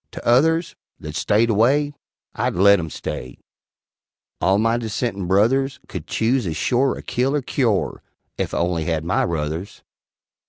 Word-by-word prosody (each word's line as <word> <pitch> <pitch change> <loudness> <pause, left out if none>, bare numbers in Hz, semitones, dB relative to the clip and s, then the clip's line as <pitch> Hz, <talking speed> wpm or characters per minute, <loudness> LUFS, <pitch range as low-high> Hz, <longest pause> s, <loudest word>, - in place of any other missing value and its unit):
T'others, 160 +8 +2 0.3
That 75 0 -8
stayed 110 +6 +2
away, 140 +7 +2 0.4
I'd - - -1
let 100 +2 +6
'em 80 -2 -4
stay 65 - -6 1.0
All 95 +1 +3
my 115 +2 +2
dissentin' 110 -4 -3
brothers 130 +8 +2
Could - - -7
chuse 115 -1 0
as 80 - -3
shore 130 +2 +1
a - - -9
kill 130 +4 0
er 145 - -1
cuore, 115 -6 0 0.4
Ef - - -1
I - - -2
only 85 -2 0
had 80 -1 -1
my 90 - +1
ruthers. 80 +4 -3
110 Hz, 150 wpm, -21 LUFS, 90-130 Hz, 1.0 s, let